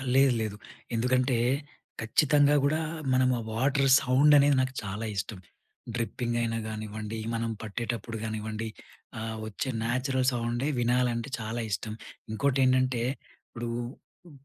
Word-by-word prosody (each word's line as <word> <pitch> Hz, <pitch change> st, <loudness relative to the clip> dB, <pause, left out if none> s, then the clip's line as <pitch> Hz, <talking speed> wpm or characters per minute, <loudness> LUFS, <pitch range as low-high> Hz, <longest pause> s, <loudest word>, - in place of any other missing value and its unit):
లేదు, 135 Hz, -1 st, +6 dB
లేదు. 110 Hz, -2 st, -2 dB, 0.4 s
ఎందుకంటే, 125 Hz, +2 st, +2 dB, 0.6 s
ఖచ్చితంగా 145 Hz, +5 st, +4 dB
గూడా 150 Hz, +3 st, +2 dB, 0.3 s
మనం 130 Hz, 0 st, +4 dB
ఆ -, -, -4 dB
వాటర్ 135 Hz, +4 st, +2 dB
సౌండ్ 135 Hz, +4 st, +5 dB
అనేది 140 Hz, 0 st, +5 dB
నాకు 130 Hz, 0 st, -1 dB
చాలా 105 Hz, +3 st, -4 dB
ఇష్టం. 100 Hz, 0 st, -3 dB, 0.6 s
డ్రిప్పింగ్ 120 Hz, 0 st, -2 dB
అయినా 115 Hz, -1 st, 0 dB
గానివ్వండి, 110 Hz, 0 st, -5 dB, 0.2 s
మనం 115 Hz, 0 st, -1 dB
పట్టేటప్పుడు 115 Hz, +1 st, -4 dB
గానివ్వండి 110 Hz, 0 st, -3 dB, 0.5 s
ఆహ్, 110 Hz, 0 st, -4 dB
వచ్చే 110 Hz, +5 st, -3 dB
న్యాచురల్ 130 Hz, +2 st, 0 dB
సౌండే 120 Hz, +2 st, -1 dB
వినాలంటే 120 Hz, 0 st, +1 dB
చాలా 115 Hz, +2 st, -3 dB
ఇష్టం. 105 Hz, +3 st, -2 dB, 0.4 s
ఇంకోటి 135 Hz, +4 st, +1 dB
ఏంటంటే, 130 Hz, -1 st, +3 dB, 0.5 s
ఇప్పుడు 120 Hz, 0 st, -6 dB, 0.6 s
ఉ -, -, -15 dB
120 Hz, 125 wpm, -28 LUFS, 110-130 Hz, 0.6 s, లేదు